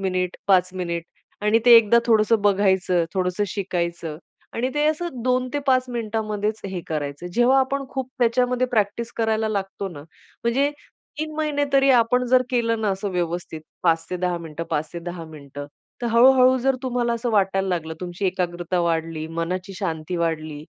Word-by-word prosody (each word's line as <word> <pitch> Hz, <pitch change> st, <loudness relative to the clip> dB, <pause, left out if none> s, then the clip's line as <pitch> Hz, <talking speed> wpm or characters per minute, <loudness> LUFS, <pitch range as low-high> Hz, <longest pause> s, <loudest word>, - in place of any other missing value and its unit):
Minute 180 Hz, -1 st, -1 dB
5 185 Hz, -1 st, +4 dB
minute 170 Hz, -2 st, -3 dB, 0.4 s
आणि 210 Hz, +2 st, +4 dB
ते 240 Hz, -1 st, +9 dB
एकदा 230 Hz, +1 st, +6 dB
थोडंस 220 Hz, -1 st, +3 dB
बघायचं, 190 Hz, -4 st, +3 dB
थोडसं 185 Hz, +2 st, 0 dB
शिकायचं 170 Hz, -5 st, -3 dB, 0.4 s
आणि 250 Hz, +3 st, 0 dB
ते 295 Hz, 0 st, +1 dB
असं 310 Hz, -5 st, -2 dB
2 255 Hz, 0 st, +1 dB
ते -, -, +2 dB
5 255 Hz, -1 st, +4 dB
मिनिटामध्येच 215 Hz, -2 st, -2 dB
हे 190 Hz, -2 st, -4 dB
करायचं. 145 Hz, +1 st, -4 dB
जेव्हा 250 Hz, +3 st, +4 dB
आपण 275 Hz, +1 st, -1 dB
खूप 260 Hz, -1 st, -4 dB
त्याच्यामध्ये 250 Hz, +1 st, +2 dB
प्रॅक्टिस 230 Hz, 0 st, -1 dB
करायला 220 Hz, -1 st, +1 dB
लागतो 195 Hz, -1 st, -3 dB
ना 160 Hz, -6 st, -10 dB, 0.4 s
म्हणजे 275 Hz, +5 st, +2 dB, 0.5 s
3 310 Hz, 0 st, -3 dB
महिने 300 Hz, -2 st, 0 dB
तरी 275 Hz, 0 st, +5 dB
आपण 250 Hz, 0 st, +3 dB
जर 255 Hz, +1 st, +4 dB
केलं 230 Hz, -2 st, +1 dB
ना 215 Hz, -, 0 dB
असं 195 Hz, +1 st, -3 dB
व्यवस्थित 175 Hz, -2 st, -3 dB, 0.2 s
5 165 Hz, 0 st, +2 dB
ते 180 Hz, -, -1 dB
10 180 Hz, -1 st, -1 dB
मिनिटं 165 Hz, 0 st, -6 dB
5 150 Hz, +1 st, -1 dB
ते 170 Hz, -, -5 dB
10 175 Hz, -1 st, -7 dB
मिनिटं 145 Hz, -2 st, -9 dB, 0.4 s
तर 240 Hz, -, 0 dB
हळू-हळू 255 Hz, +2 st, +6 dB
जर 265 Hz, +2 st, +2 dB
तुम्हाला 245 Hz, -2 st, 0 dB
असं 235 Hz, +1 st, -2 dB
वाटायला 195 Hz, -2 st, +1 dB
लागल, 165 Hz, -3 st, -2 dB
तुमची 180 Hz, +2 st, -3 dB
एकाग्रता 180 Hz, -1 st, -1 dB
वाढली, 165 Hz, -2 st, -1 dB
मनाची 170 Hz, +4 st, -4 dB
शांती 165 Hz, -2 st, -3 dB
वाढली 155 Hz, -3 st, -2 dB
200 Hz, 170 wpm, -23 LUFS, 175-240 Hz, 0.5 s, ते